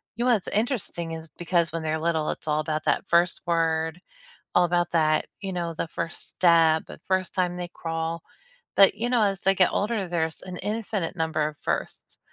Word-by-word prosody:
you 240 +2 -1
know, 250 - +4
what's 205 - -1
interesting 205 -7 -2
is, 160 0 -7
because 170 -2 +1
when 165 - -2
they're 155 0 -1
little, 160 -1 0
it's - - -8
all 150 0 +1
about 155 0 -2
that - - +1
1st 170 +1 +3
word, 160 0 +1 0.6
all 180 - +6
about 175 0 +1
that, 155 -2 +2
you 195 -2 -3
know, 170 -2 -2
the 160 - -2
1st 165 - -5
step, 165 -3 +4
the - - -10
1st 185 -1 0
time 180 -1 +1
they 175 -1 -5
crawl. 165 0 -3 0.5
But, 195 -1 +7
you 230 +4 -2
know, 245 -3 +3
as 195 -3 +1
they 195 0 +3
get 185 -1 +4
older, 205 -3 -1
there's 160 -2 -2
an 180 -1 -7
infinite 210 -5 -2
number 160 -2 0
of 150 - -10
firsts. - - -4
170 Hz, 200 wpm, -26 LUFS, 160-190 Hz, 0.6 s, But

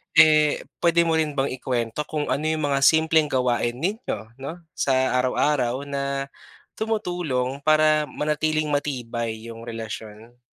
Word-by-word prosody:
Eh, 155 -2 +5 0.2
pwede 170 0 +4
mo 160 -1 +1
rin 150 -2 -1
bang 135 0 0
ikwento 125 +1 -2
kung 150 -2 -3
ano 150 - 0
yung 155 -1 0
mga 135 - +2
simpleng 160 -1 +4
gawain 125 -3 0
ninyo 135 - -3
'no, 165 +6 -7
sa 130 -1 +1
araw-araw 130 0 +1
na 140 -1 -3 0.5
tumutulong 175 - -1
para 155 -1 +4
manatiling 155 0 -1
matibay 120 -6 -2 0.2
yung 115 +1 -10
relasyon? 115 +1 -8
140 Hz, 130 wpm, -24 LUFS, 125-155 Hz, 0.5 s, Eh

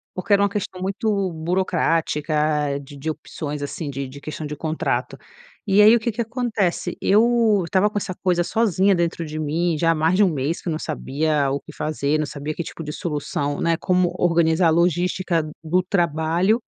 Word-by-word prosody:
porque 195 +3 0
era 200 - +5
uma 200 - +3
questão 195 -2 -4
muito 200 0 -1
burocrática, 155 -4 0
de 140 +1 -12
de 145 +3 -4
opções, 150 -1 -6
assim, 145 +1 -4
de 140 0 -4
de 135 +2 -11
questão 155 +1 -6
de 150 - -5
contrato, 155 +2 -2 0.5
e 200 +1 +5
aí 215 +2 +8
o - - +2
que 235 +2 -1
que 230 +2 -3
acontece, 230 -6 -1
eu 220 0 +4
estava 190 +4 +2
com 210 - -3
essa 190 -2 -5
coisa 180 -2 +2
sozinha 200 -1 +2
dentro 170 -1 -1
de 155 0 -5
mim, 160 +2 0
já 165 +2 +3
há - - +1
mais 160 +3 +2
de 205 - +5
1 - - +5
mês, 145 +4 -2
que - - -9
eu - - 0
não 155 - -2
sabia 150 -2 -1
o 140 - -1
que - - -12
fazer, 150 -1 -1
não 155 - 0
sabia 145 +1 -5
que 170 - -3
tipo 165 - -8
de 150 - -5
solução, 145 -2 -3
né, 165 -1 +2
como 180 0 +1
organizar 170 0 +3
a - - +3
logística 175 0 +1 0.2
do 180 +3 +1
trabalho, 175 +3 +1
170 Hz, 200 wpm, -22 LUFS, 155-190 Hz, 0.5 s, aí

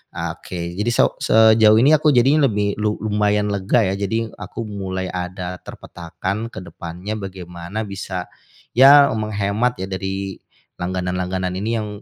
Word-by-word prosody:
Ah, - - -3
oke, 85 0 -6
jadi 105 +3 +1
so - - +2
sejauh 110 -1 +5
ini 140 +5 +5
aku 150 +1 +2
jadinya 140 +4 +4
lebih 105 -1 -1
lu 105 0 +1
lumayan 105 -1 +1
lega, 100 +4 +2
ya. 95 - 0
Jadi, 110 +3 -2
aku 105 +3 -6
mulai 95 -2 -4
ada 90 0 -5
terpetakan 90 +6 -6
ke - - -6
depannya 90 +4 -7
bagaimana 90 +1 -6
bisa 95 -2 -5 0.5
ya, 140 +3 +8
menghemat 110 +2 -1
ya, 95 - -3
dari 95 0 -4 0.4
langganan-langganan 90 0 -2
ini 110 +3 -2
yang 105 - -4
100 Hz, 145 wpm, -20 LUFS, 90-110 Hz, 0.5 s, ya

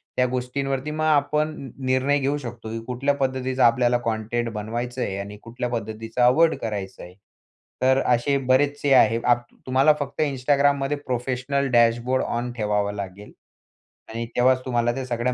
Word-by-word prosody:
त्या 125 - +3
गोष्टींवरती 135 +3 -3
मग 155 +1 -3
आपण 150 0 +2
न 135 - -8 0.2
निर्णय 130 +3 +2
घेऊ 140 +2 0
शकतो, 120 -5 -8
की 115 - -4
कुठल्या 130 +3 0
पद्धतीचा 130 -1 0
आपल्याला 120 +1 +3
कॉन्टेंट 115 +1 -1
बनवायचं 120 +4 -4
आहे 95 -4 -2
आणि 100 +1 -7
कुठल्या 120 +2 -4
पद्धतीचा 115 +1 -2
अव्हॉइड 160 +6 +4
करायचं 100 -4 -5
आहे. 90 - -11 0.7
तर 130 +1 +4
अशे 125 +3 +2
बरेचसे 145 +2 +2
आहे. 115 -3 +5
आप 120 0 +3 0.2
तुम्हाला 135 +4 +4
फक्त 145 +1 -4
Instagramमध्ये 140 0 +1
प्रोफेशनल 130 +2 -1
डॅशबोर्ड 120 +2 +3
ऑन 120 +1 -3
ठेवावं 105 -2 0
लागेल 100 +1 -7 0.8
आणि 115 +1 -3
तेव्हाच 130 +1 +3
तुम्हाला 120 -2 +1
त्या 135 -1 -4
सगळ्या 120 0 -1
125 Hz, 155 wpm, -23 LUFS, 115-135 Hz, 0.8 s, आहे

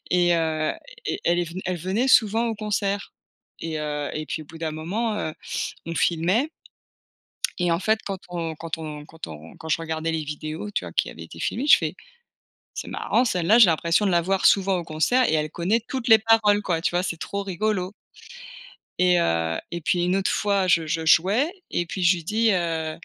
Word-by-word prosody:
et 175 -1 +4
heu, 160 -2 0 0.3
et - - -2
elle 175 +1 +2
est 175 - +1
ven 170 +3 -7
elle 185 0 -1
venait 190 +10 -1
souvent 225 -1 +4
au 225 - -1
concert 205 -1 -2 0.5
et 160 -1 -3
heu, 150 -1 -3
et 155 - -3
puis 155 - -4
au - - -14
bout 165 - -12
d'un 160 -1 -2
moment, 195 +9 -2
heu, 155 -7 -3 0.5
on 165 - -5
filmait. 180 - +1 1.1
Et 175 -1 +1
en 165 - +1
fait 220 +2 +1
quand 195 -1 -4
on 170 -2 -4
quand 165 +1 -5
on 150 -2 -7
quand 160 +2 -9
on 80 0 -11
quand 160 - -9
je 160 - +2
regardais 160 0 -2
les 160 -1 -2
vidéos, 155 +6 -5
tu 200 - -2
vois? 85 - -8
Qui - - 0
avait 80 - -10
été 80 0 -12
filmées, 250 - -2
je - - +9
fais: - - -3 0.8
«C'est - - -6
marrant, 250 - +1
celle 180 -7 -1
là 220 - +6
j'ai 230 - +10
l'impression 170 +3 +2
de 195 - +2
la 170 -1 +3
voir 190 +2 0
souvent 195 -1 +4
au 175 - -3
concert 165 +12 +2
et - - +1
elle 155 -1 +1
connaît 190 +8 0
toutes 260 -4 -4
les 220 -1 +8
paroles 215 -2 +4
quoi.», 170 -5 -1
tu - - 0
vois? 175 +1 0
C'est 170 -2 -3
trop 200 +5 -4
rigolo 195 0 -1 1.1
et 180 -1 +4
heu, 80 - 0
et 170 - -4
puis 175 +2 +1
une 180 +2 +1
autre 195 -1 0
fois 200 -2 +1
je 165 -2 +3
je 160 +1 -2
jouais 200 - +4 0.2
et 175 - -1
puis 185 +2 -5
je 175 +1 +5
lui 170 - -8
dis: 220 +5 +2
«Heu». 165 -3 -1
175 Hz, 220 wpm, -24 LUFS, 160-205 Hz, 1.1 s, j'ai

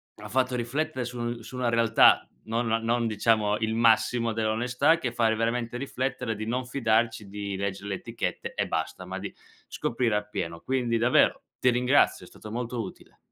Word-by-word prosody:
ha - - -10
fatto 130 0 +1
riflettere 130 +2 -2
su 120 -1 -4
su 125 +3 -9
una 125 -2 +1
realtà, 115 -1 +5 0.2
non 115 +2 -1 0.2
non 120 0 +1
diciamo 105 -1 +2
il 110 0 -1
massimo 115 0 +3
dell'onestà, 120 +8 +2
che 125 -7 -3
fa 115 -1 +2
veramente 115 +1 -1
riflettere 125 -3 -3
di 110 +1 -5
non 125 +2 -1
fidarci 115 -4 0
di 100 0 -5
leggere 100 +1 -4
le 95 - -1
etichette - - -4
e - - 0
basta, 90 - -3
ma 95 +1 -5
di 100 0 -6 0.3
scoprire 115 -3 -1
appieno. 85 -5 -3
Quindi 120 0 0
davvero, 120 +2 +3 0.2
ti 125 - +4
ringrazio, 125 +3 +3
è - - -14
stato 110 - -11
molto 120 0 -3
utile. 95 - -10
115 Hz, 170 wpm, -27 LUFS, 110-125 Hz, 0.3 s, realtà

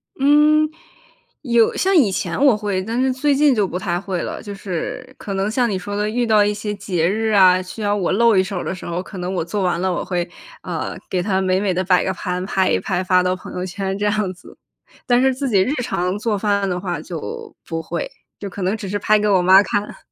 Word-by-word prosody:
嗯， 300 +2 +4 0.7
有 235 -5 +2
像 385 0 +2
以 240 - +5
前 175 +3 -2
我 270 -6 +6
会， 205 -3 -2
但 225 +6 -2
是 260 0 +2
最 280 +2 +1
近 290 -1 +4
就 210 -5 +1
不 180 - -4
太 180 -2 -2
会 185 -3 -3
了。 - - -5
就 205 - -7
是 190 -4 -5
可 200 - -6
能 195 +2 -1
像 240 +1 +1
你 195 - -1
说 205 +2 -5
的 210 +1 -1
遇 240 +2 0
到 215 -2 +4
一 205 0 +1
些 210 0 -4
节 185 -4 -1
日 220 +3 0
啊， 185 -3 +6
需 185 +4 -9
要 205 0 +1
我 185 -4 -1
露 230 +2 +4
一 185 - +4
手 190 0 -5
儿 - - -4
的 - - -3
时 185 - -9
候， 170 +1 -3
可 195 - -10
能 180 +1 -3
我 180 - -1
做 200 +3 -3
完 175 -2 0
了， 185 +1 0
我 - - -2
会， 175 -1 -2 0.4
呃， - - -4
给 180 -1 0
它 190 0 0
美 185 0 +1
美 195 -2 0
地 185 +1 0
摆 180 -1 +3
个 190 - -1
盘， 180 -1 -3
拍 190 -1 +1
一 - - +2
拍 185 -1 -2
发 185 0 +3
到 180 0 0
朋 185 - -10
友 180 - -3
圈 195 +1 -3
这 205 - -2
样 205 -2 0
子。 180 - -16 0.5
但 245 0 +3
是 265 0 +3
自 275 -1 -2
己 200 -4 +3
日 260 +9 +1
常 180 -4 -1
做 210 -1 -1
饭 200 -1 0
的 180 -1 -2
话 180 -1 -4
就 455 -2 -7
不 165 -1 -3
会， 170 +1 -4 0.3
就 200 - -5
可 195 - -8
能 190 +3 0
只 200 - -6
是 205 - -1
拍 215 +1 +3
给 210 - 0
我 195 -3 +4
妈 190 +2 +7
看。 205 +1 -3
200 Hz, 275 characters per minute, -20 LUFS, 185-220 Hz, 0.7 s, 妈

